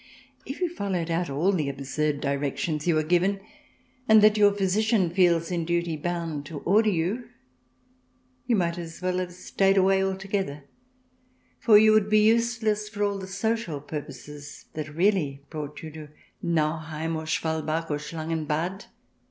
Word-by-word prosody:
If 270 - -6
you 350 -2 0
followed 185 - -2
out 170 0 0
all 155 +8 +1
the 155 -7 0
absurd 140 +2 -2
directions 145 +3 -2
you 165 -2 +3
are 155 - +2
given, 180 +5 +2 0.7
and 220 -1 +7
that 215 0 +6
your 205 -1 +5
physician 200 -1 +1
feels 175 -2 +3
in 170 -2 -1
duty 170 0 -1
bound 165 -2 -3
to 160 - -7
order 215 +3 +3
you, 205 +7 -1 1.2
you 240 - +3
might 175 -3 0
as 165 -1 -8
well 185 0 0
have 180 -1 -3
stayed 195 +2 +1
away 190 0 +4
altogether, 190 -6 -2 1.0
for 215 -3 +6
you 215 +1 +6
would 215 -1 +3
be 215 0 +5
useless 220 -2 +1
for 205 -1 -3
all 200 -1 0
the 190 - -7
social 200 -5 -2
purposes 145 0 -8
that 155 0 -5
really 155 -5 0
brought 150 -1 -6
you 160 - -7
to 155 -1 -10 0.3
Nauheim, 160 -1 -1
or 160 0 -5
Schwalbach, 160 0 -1
or 145 - -1
Schlangen 160 +1 -4
Bad. 175 +6 -2
170 Hz, 160 wpm, -26 LUFS, 155-200 Hz, 1.2 s, and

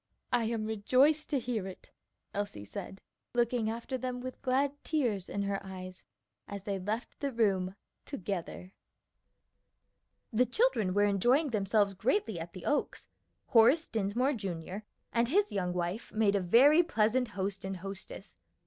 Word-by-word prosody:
"I 240 -2 +3
am 225 -1 -1
rejoiced 255 +8 +3
to 290 - +1
hear 235 -6 -2
it," 190 - -11 0.4
Elsie 200 - -4
said, 190 - -8 0.3
looking 235 -2 +2
after 235 +3 -4
them 250 0 -3
with 255 +1 -7
glad 275 +2 +1
tears 235 - 0
in 200 - -2
her 200 0 -2
eyes 185 -1 -8 0.4
as 200 -1 -6
they 200 -1 -2
left 215 +5 -4
the 280 -1 -1
room 195 -5 +1 0.3
together. 190 - -5 1.6
The 245 +3 +3
children 250 - +2
were 205 - +4
enjoying 245 - +3
themselves 205 -1 +2
greatly 220 - 0
at 170 +1 -7
the 185 - -9
Oaks. 295 - -1 0.4
Horace 250 +7 +6
Dinsmore, 225 +6 0
Jr., 190 - -4 0.4
and 235 0 +2
his 405 +7 +3
young 180 -3 -1
wife 180 +5 -3
made 215 -2 +3
a 200 - +2
very 265 - +6
pleasant 250 -5 +1
host 195 0 -2
and 190 0 -4
hostess. 195 +1 -9
215 Hz, 150 wpm, -31 LUFS, 195-255 Hz, 1.6 s, Horace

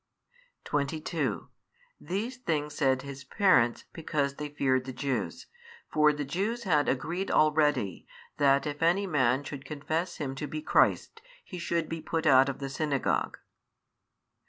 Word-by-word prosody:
22 155 +3 -2 0.5
These 220 +8 -4
things 150 - -2
said 130 -3 +1
his 140 -1 -8
parents, 130 - +3
because 150 -4 -1
they 150 0 -4
feared 130 -3 +1
the 130 - -5
Jews: 135 0 -3 0.5
for 150 0 +5
the 145 -1 -4
Jews 205 - -2
had 150 -8 +2
agreed 170 +9 -2
already, 150 - +2 0.3
that 140 -1 +3
if 145 0 -4
any 175 +5 +3
man 135 -6 +2
should 140 -1 -7
confess 155 +5 -3
Him 135 -3 -3
to 150 - -4
be 155 +2 -5
Christ, 455 - +2 0.2
he 180 - -8
should 170 -1 -1
be 165 -1 -5
put 160 +1 -2
out 135 -2 +6
of 135 - -4
the 140 - -5
synagogue. 140 0 -1
150 Hz, 145 wpm, -29 LUFS, 135-165 Hz, 0.5 s, out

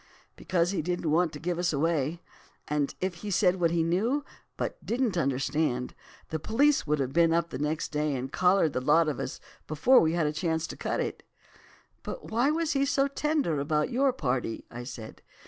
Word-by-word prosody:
"'Because 175 0 0
he 200 - -1
didn't 175 -1 -2
want 170 +1 +3
to 150 - -8
give 175 +1 -2
us 175 0 +1
away, 160 +1 0 0.4
and 150 -1 -1
if 185 0 -1
he 210 - -5
said 185 -1 +2
what 170 -1 +3
he 165 0 +1
knew, 225 - 0 0.3
but - - -4
didn't 235 -4 0
understand, 135 -3 0 0.4
the 160 - -2
police 270 - +2
would 150 +1 +2
have 135 -2 -2
been 170 -1 +4
up 170 0 0
next 150 +4 -2
day 150 -1 0
and 130 +1 -5
collared 180 -4 +3
the 125 - -1
lot 155 +4 +4
of 145 -6 -2
us - - -4 0.3
before 205 - +5
we 160 0 +2
had 170 -2 +1
a 150 - 0
chance 160 0 -1
to - - -7
cut - - -2
it.' - - -3 0.8
"'But - - -7
why 240 +5 +2
was 320 0 0
he 275 -1 +2
so 275 0 +2
tender 280 - 0
about 150 +1 0
your 270 +2 +3
party?' 125 - -2
I 120 +1 -7
said. 115 -4 -9
165 Hz, 200 wpm, -28 LUFS, 150-195 Hz, 0.8 s, before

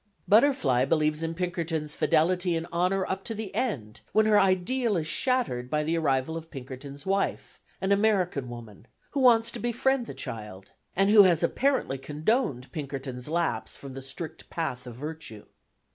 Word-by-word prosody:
Butterfly 205 - +4
believes 155 +1 +1
in 165 0 -3
Pinkerton's 165 -4 -2
fidelity 175 +2 +2
and 165 0 -2
honour 185 +2 +1
up 190 +1 -3
to 225 - -3
the 210 -2 -6
end, 120 - -3
when 215 0 +4
her 215 -1 +5
ideal 195 +4 +2
is 160 - -1
shattered 160 - 0
by 150 +1 +1
the 160 +2 0
arrival 145 -1 0
of 165 0 -7
Pinkerton's 135 0 -9
wife, 195 +1 -1 0.2
an 190 - -1
American 190 - +2
woman, 115 -2 -10 0.2
who 285 - -1
wants 235 -3 +5
to - - -6
befriend 240 +1 0
the - - -7
child, 105 -7 -7 0.2
and 195 +2 +3
who 215 -1 +9
has 175 -4 +4
apparently 250 - +1
condoned 150 - -1
Pinkerton's 135 -3 -5
lapse 170 +1 -1
from 140 -1 -9
the 135 - -7
strict 135 +5 -7
path 125 -7 -4
of 120 - -8
virtue. 150 -6 -7
165 Hz, 165 wpm, -27 LUFS, 135-200 Hz, 0.2 s, who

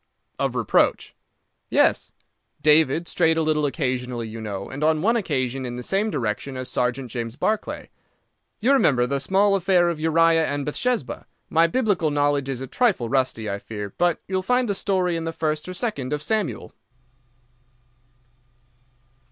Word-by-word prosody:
"Of - - -1
reproach?" - - +1 0.6
"Yes; - - +2 0.5
David 155 +2 +4
strayed 165 -2 +2
a 160 - +2
little 155 -1 +1
occasionally, 125 -4 -2
you 110 +1 -7
know, 100 -3 -5
and 145 +3 -5
on 155 0 +2
one 230 +4 +3
occasion 135 - -1
in 120 -1 -5
the 125 - -6
same 200 - 0
direction 125 - -3
as 130 0 -4
Sergeant 125 0 -1
James 115 0 -4
Barclay. 215 +8 -2 0.7
You 250 +6 +3
remember 135 - +3
the 140 +2 -1
small 195 +7 +2
affair 180 -2 +3
of 170 -3 -3
Uriah 165 0 +3
and 145 -1 -2
Bathsheba? 230 - -2 0.2
My 165 +1 +4
biblical 200 -5 +1
knowledge 145 -1 +1
is 130 -2 -3
a - - -3
trifle 175 - +1
rusty, 130 -4 0
I 100 0 -3
fear, 105 -2 -7
but 175 -1 +1
you 190 - -8
will 185 - +1
find 250 +5 +1
the 200 - 0
story 185 -3 0
in 165 0 -3
the 165 - -2
first 155 +1 -2
or - - -5
second 150 - -3
of 150 0 -3
Samuel." 215 -6 -2
155 Hz, 165 wpm, -23 LUFS, 130-185 Hz, 0.7 s, David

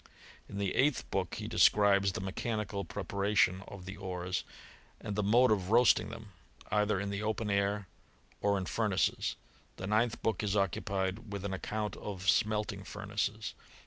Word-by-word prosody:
In 100 - -6
the 100 -1 0
eighth 140 0 +2
book 95 -2 -1
he - - -5
describes 100 -2 +5
the - - -3
mechanical 100 +1 -2
pre 100 - -5
paration 100 -2 +2
of 95 -2 -9
the 95 +1 -7
ores, 90 -1 -3 0.6
and 105 - -4
the 105 - +1
mode 120 +5 +5
of 95 -3 +1
roasting 120 +2 +5
them, 110 -2 -9 0.4
either 105 -1 +2
in 100 +1 -2
the 100 +1 -3
open 110 0 -1
air 100 0 +1 0.5
or 100 0 +2
in 95 - -2
furnaces. 105 -1 0 0.4
The 95 - -6
ninth 110 +4 +1
book 110 -4 +1
is 105 -1 0
occupied 100 +2 -1
with 100 -1 -4
an 100 - -2
account 105 +2 -3
of 95 -3 -6
smelting 105 -1 +2
furnaces. 105 +2 -3
100 Hz, 165 wpm, -32 LUFS, 95-105 Hz, 0.6 s, describes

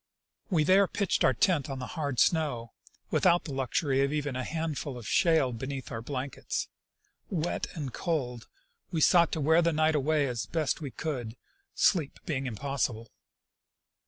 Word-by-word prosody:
We 165 -6 +3
there 190 +5 +5
pitched 200 -1 0
our 130 - +4
tent 165 - +2
on 135 - -4
the 125 - -5
hard 140 -5 -2
snow, 140 -9 +1 0.4
without 175 -1 +4
the 145 - -6
luxury 135 +1 0
of 140 0 +1
even 145 -3 -2
a 130 - -2
few - - -7
handfuls 155 -4 -3
of 115 -3 -8
shale 160 -8 +3
beneath 130 +3 -5
our 115 - -4
blankets. 130 +2 -4 0.6
Wet 175 -2 -2
and 140 -7 -5
cold, 125 -9 -2 0.4
we 170 -4 -1
sought 170 +1 +5
to 160 - -1
wear 160 +3 +4
the 170 0 +2
night 155 0 +2
away 150 0 +2
as 120 -2 -3
best 160 -1 -1
we 145 - -4
could, 125 -6 -4 0.4
sleep 165 -8 +2
being 135 -4 -2
impossible. 125 -2 -2
145 Hz, 165 wpm, -29 LUFS, 130-160 Hz, 0.6 s, there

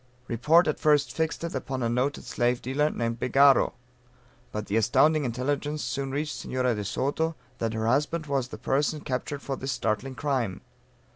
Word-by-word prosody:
Report 150 +9 +4
at 155 - 0
first 150 -2 +3
fixed 160 0 -1
it 170 - -3
upon 130 -1 -3
a - - +2
noted 125 +5 0
slave 120 0 0
dealer, 145 +4 0
named 115 -3 -2
Begaro. 135 +1 +5 0.8
But 105 0 -4
the 100 - -2
astounding 145 +7 +3
intelligence 145 +5 -2
soon 135 +3 -2
reached 145 +2 -2
Senora 125 -1 0
de 105 -2 -3
Soto, 160 +9 -1 0.2
that 115 -1 -1
her 110 0 -1
husband 150 +7 +1
was 135 -4 -1
the - - -8
person 145 +2 0
captured 140 +1 -3
for 135 - -2
this 135 +1 -4
startling 130 +2 -2
crime. 125 -11 -1
135 Hz, 170 wpm, -27 LUFS, 120-150 Hz, 0.8 s, Begaro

